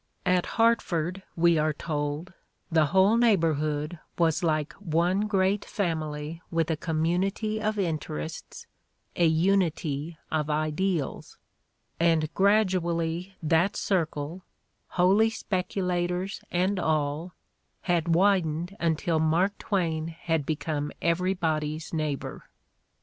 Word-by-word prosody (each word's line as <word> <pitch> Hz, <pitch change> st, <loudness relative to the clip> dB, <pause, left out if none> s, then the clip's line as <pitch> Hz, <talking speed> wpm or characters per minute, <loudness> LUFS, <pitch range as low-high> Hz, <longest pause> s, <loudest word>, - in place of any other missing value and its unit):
At 180 Hz, -1 st, +2 dB
Hartford, 195 Hz, -6 st, +2 dB
we 170 Hz, -1 st, +4 dB
are 155 Hz, 0 st, +1 dB
told, 150 Hz, +3 st, -3 dB, 0.4 s
the 160 Hz, -2 st, +4 dB
whole 190 Hz, +7 st, +4 dB
neigh 235 Hz, -4 st, +5 dB
borhood 155 Hz, 0 st, -1 dB, 0.2 s
was 165 Hz, -3 st, +2 dB
"like 155 Hz, -3 st, 0 dB
one 180 Hz, +3 st, +1 dB
great 195 Hz, 0 st, +1 dB
family 160 Hz, -4 st, -3 dB
with 165 Hz, -1 st, 0 dB
a -, -, +1 dB
community 180 Hz, +7 st, -1 dB
of 215 Hz, 0 st, -1 dB
interests, 155 Hz, -, -4 dB, 0.5 s
a 170 Hz, -, +4 dB
unity 160 Hz, -3 st, +1 dB
of 155 Hz, -1 st, 0 dB
ideals, 155 Hz, +1 st, -1 dB, 0.2 s
' -, -, -48 dB
' -, -, -43 dB
and 165 Hz, -2 st, +2 dB
gradually 185 Hz, -3 st, +1 dB
that 165 Hz, +5 st, +2 dB
cir 180 Hz, -5 st, +1 dB
cle, 155 Hz, +4 st, -6 dB, 0.6 s
"Holy 195 Hz, +5 st, +5 dB
Speculators" 180 Hz, -2 st, -2 dB
and 185 Hz, +2 st, +1 dB
all, 155 Hz, +1 st, -1 dB, 0.5 s
had 170 Hz, -2 st, +1 dB
widened 175 Hz, -2 st, +2 dB
until 165 Hz, 0 st, +1 dB
Mark 170 Hz, +6 st, +2 dB
Twain 165 Hz, -6 st, -1 dB
had 165 Hz, -2 st, -2 dB
become 150 Hz, -1 st, -2 dB
everybody's 165 Hz, -3 st, 0 dB
neighbor. 155 Hz, -4 st, -3 dB
170 Hz, 110 wpm, -27 LUFS, 155-185 Hz, 0.6 s, neigh